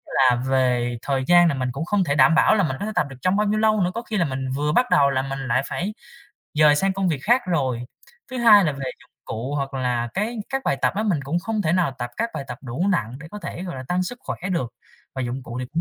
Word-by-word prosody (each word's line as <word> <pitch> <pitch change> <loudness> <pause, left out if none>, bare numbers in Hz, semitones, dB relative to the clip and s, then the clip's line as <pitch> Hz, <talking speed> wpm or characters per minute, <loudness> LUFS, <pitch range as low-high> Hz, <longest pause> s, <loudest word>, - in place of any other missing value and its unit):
là 130 -2 +5
về 125 -2 +1
thời 135 -1 -1
gian 175 0 +6
là 165 - +2
mình 130 -2 -2
cũng 140 +6 -4
không 200 +1 +1
thể 140 -5 0
đảm 135 +3 +5
bảo - - +5
là 200 - +2
mình 130 -6 -1
có - - -3
thể 215 - -3
tập 180 -5 +2
được 135 - -9
trong 185 +6 +2
bao 210 +1 +1
nhiêu 215 +1 +1
lâu 215 -2 +3
nữa, 180 - +1
có 230 - -3
khi 225 -2 -4
là 175 - +2
mình 130 -2 -3
vừa 150 +2 0
bắt 245 +11 +3
đầu 140 -1 +5
là 130 -1 0
mình 135 0 -5
lại 125 +2 +2
phải 200 +5 -3 0.6
dời 150 -1 +5
sang 195 +5 +1
công 190 -1 0
việc 155 -5 0
khác 245 - +3
rồi. 130 -9 -1 0.5
Thứ 255 - -4
hai 215 -4 +7
là 150 - +1
về 140 - -9 0.2
dụng - - -21
cụ 125 +6 -4
hoặc 140 -1 -3
là 125 -2 -1
cái 215 +5 -1
các 270 0 -2
bài - - +1
tập - - +3
á, 210 - +1
mình 195 -9 0
cũng 155 +6 -1
không 215 +3 -2
thể 155 - +1
nào 175 -6 +2
tập 120 0 -4
các 230 +1 -1
bài 145 -3 -4
tập - - -6
đủ 135 +10 -2
nặng 125 - -1
để 165 - -10
có 210 - -7
thể, 180 - -6
gọi 180 -6 -6
là, 130 - -6
tăng 180 +1 +1
sức 245 +7 -5
khỏe - - -5 0.2
được 130 -10 -2 0.4
và 130 - -3
dụng 125 +2 -4
cụ 120 0 -7
thì 125 - -4
cũng 165 - 0
150 Hz, 290 wpm, -23 LUFS, 130-195 Hz, 0.6 s, hai